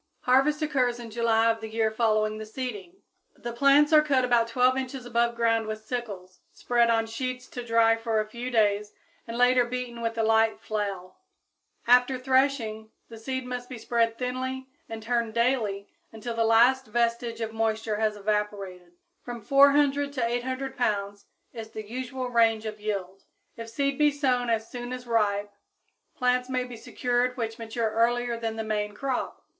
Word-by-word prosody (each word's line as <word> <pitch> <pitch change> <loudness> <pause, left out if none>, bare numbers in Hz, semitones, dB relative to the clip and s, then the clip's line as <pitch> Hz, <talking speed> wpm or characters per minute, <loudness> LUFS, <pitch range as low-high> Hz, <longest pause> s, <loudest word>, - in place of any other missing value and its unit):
Harvest 275 +5 +3
occurs 255 -5 0
in 230 -2 -9
July 230 0 +3
of 225 0 -5
the 220 - -6
year 220 0 0
following 215 -1 +1
the 215 - -6
seeding. 250 - -6 0.4
The 240 0 -6
plants 280 +5 +4
are 305 - +8
cut 275 -4 +2
about 240 -2 +3
12 250 +2 +3
inches 265 -1 -4
above 235 0 +1
ground 230 -1 +1
with 215 0 -6
sickles, 200 -7 -6
spread 240 -1 +1
on 225 -1 +2
sheets 250 +2 -4
to 245 - -6
dry 230 -1 +4
for 225 -1 -1
a 215 - 0
few 235 +3 -6
days, 210 -3 +1 0.3
and 230 0 -5
later 245 0 +5
beaten 240 -1 -5
with 230 0 -2
a 225 - +1
light 225 0 +3
flail. 200 -4 -4 0.7
After 250 +2 +4
threshing, 255 -4 0 0.2
the 225 -1 -10
seed 260 +2 -4
must 250 0 -6
be 255 - -7
spread 230 0 0
thinly 260 +1 -3 0.2
and 225 -1 -7
turned 235 -1 -1
daily 230 -5 0 0.2
until 225 +2 -6
the 230 0 +1
last 245 +4 +4
vestige 235 +1 -1
of 225 -1 -4
moisture 220 -1 -1
has 215 -1 0
evaporated. 200 -4 -3 0.3
From 240 -1 -7
400 280 +2 +4
to 255 -4 0
800 260 +3 -3
pounds 205 -4 -2 0.3
is 225 -2 -7
the 215 -1 -8
usual 255 +2 -4
range 225 -2 +2
of 215 -1 -6
yield. 195 -2 -4 0.3
If 230 0 -8
seed 275 +4 -1
be 300 0 +5
sown 260 -4 0
as 225 -1 0
soon 245 0 -6
as 250 0 -7
ripe, 205 -3 0 0.6
plants 250 0 +1
may 255 -1 0
be 250 -1 -8
secured 245 +2 -1
which 225 -1 -4
mature 225 0 -2
earlier 240 +2 +1
than 225 -1 -3
the 220 - -3
main 210 -1 -2
crop. 265 +2 -3
235 Hz, 175 wpm, -27 LUFS, 220-250 Hz, 0.7 s, are